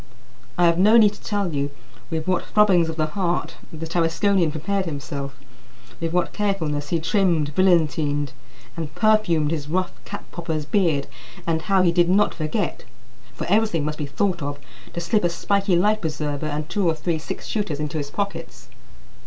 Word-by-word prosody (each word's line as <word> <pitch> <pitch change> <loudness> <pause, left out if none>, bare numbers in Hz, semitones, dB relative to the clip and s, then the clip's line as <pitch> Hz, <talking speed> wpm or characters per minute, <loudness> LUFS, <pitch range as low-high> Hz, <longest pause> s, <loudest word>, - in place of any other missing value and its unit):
I 175 - +4
have 170 0 +3
no 215 +5 +6
need 210 -3 +6
to - - -15
tell 200 -5 -1
you 140 0 -1 0.4
with 160 -1 -2
what 185 -1 +1
throbbings 190 -6 +4
of 160 - -4
the 155 -1 +1
heart 175 +2 -2
the 160 -1 -6
Tarasconian 170 +2 +2
prepared 185 +6 -2
himself; 140 -3 -5 0.6
with 165 -1 -2
what 180 +1 0
carefulness 160 -8 -1
he 170 - +1
trimmed, 165 -4 +1
brilliantined, 155 -5 +2 0.4
and 160 -3 -5
perfumed 215 -9 +3
his 150 -3 -3
rough 185 +2 0
cap - - -7
popper's 160 -3 -3
beard, 160 -6 +1 0.4
and 160 -1 0
how 195 +1 +3
he 175 - +4
did 175 0 +3
not 205 +3 +3
forget 160 +5 -2 0.5
for - - -4
everything 200 -5 +2
must 150 +1 -3
be 150 - -2
thought 170 +4 -1
of 145 0 -3 0.4
to - - -3
slip 210 +5 +1
a 175 - +3
spiky 195 +2 +1
life 210 +5 +3
preserver 155 -2 -2
and 150 0 -3
two 200 +1 0
or 160 - +1
three 160 +1 -1
six 190 +5 -6
shooters 200 -9 -2
into 150 +1 -2
his 140 -1 -4
pockets. 200 +6 -5
170 Hz, 180 wpm, -23 LUFS, 150-195 Hz, 0.6 s, no